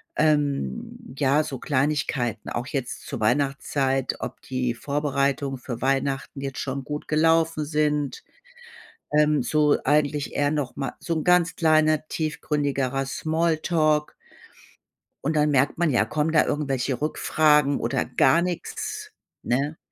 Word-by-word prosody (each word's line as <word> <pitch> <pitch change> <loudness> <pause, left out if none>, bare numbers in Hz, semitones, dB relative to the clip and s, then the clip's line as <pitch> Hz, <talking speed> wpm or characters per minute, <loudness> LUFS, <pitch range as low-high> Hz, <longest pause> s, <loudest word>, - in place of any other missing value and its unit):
Ähm, 145 - -1
ja, 140 +1 +3
so 135 -3 -5
Kleinigkeiten 130 -5 -1
auch 120 +2 -3
jetzt 135 +1 -4
zur 135 -6 -5
Weihnachtszeit, 135 +2 0
ob 130 0 -6
die 125 -2 -2
Vorbereitungen 140 0 -1
für 120 -1 -7
Weihnachten 135 +1 -1
jetzt 135 -1 -5
schon 135 0 -3
gut 150 +1 -6
gelaufen 160 0 +2
sind. 150 -2 -1 0.9
Ähm, 150 -2 +3
so 150 +1 +3
eigentlich 145 0 +1
eher 145 0 +2
noch 145 -5 -3
mal 135 - -3
so 170 - -2
'n 155 - -1
ganz 180 -1 +3
kleiner, 155 -2 +3
tiefgründigerer 140 -3 -1
Small 160 +3 0
Talk 155 -2 +1 1.1
und 155 - +1
dann 150 0 +3
merkt 140 +1 +2
man 175 -1 +2
ja, 125 -5 +3
kommen 155 +1 -1
da 155 - +5
irgendwelche 135 -3 -1
Rückfragen 150 -1 +2
oder 115 - -1
gar 130 +6 +3
nix, 180 -2 -4 0.3
ne? 140 +6 -1
145 Hz, 135 wpm, -24 LUFS, 135-155 Hz, 1.1 s, da